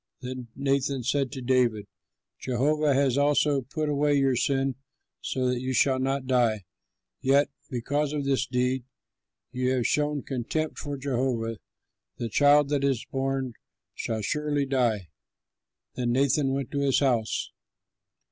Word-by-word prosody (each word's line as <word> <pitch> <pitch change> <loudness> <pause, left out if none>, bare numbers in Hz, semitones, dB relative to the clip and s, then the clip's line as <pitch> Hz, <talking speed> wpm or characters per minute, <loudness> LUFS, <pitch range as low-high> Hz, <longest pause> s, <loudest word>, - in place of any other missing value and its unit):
Then 125 -1 -6
Nathan 135 -1 0
said 135 +1 0
to 130 -3 -6
David, 120 -4 +2 0.5
"Jehovah 145 +3 +1
has 135 -1 +2
also 145 -1 +3
put 150 +5 -3
away 145 0 +2
your 135 -2 +3
sin 135 +2 +1 0.5
so 130 -1 -2
that 125 -1 0
you 130 0 -2
shall 130 0 +3
not 135 0 -1
die. 120 -5 +2 0.6
Yet, 140 +2 +3 0.2
because 140 +4 -1
by 150 -1 -1
this 135 -1 0
deed 125 0 0 0.7
you 125 +1 -1
have 125 -3 0
shown 150 -1 0
contempt 140 +5 -3
for 145 -1 -4
Jehovah, 125 -4 -1 0.6
the 115 - -3
child 145 +3 +5
that 145 -2 0
is 135 -4 0
born 135 -2 -1 0.4
shall 110 -2 -3
surely 150 +3 0
die." 120 - 0 0.8
Then 120 -1 -1
Nathan 135 +1 +2
went 135 -2 -3
to 140 - -1
his 140 -2 +3
house. 120 -6 0
135 Hz, 140 wpm, -27 LUFS, 125-140 Hz, 0.8 s, child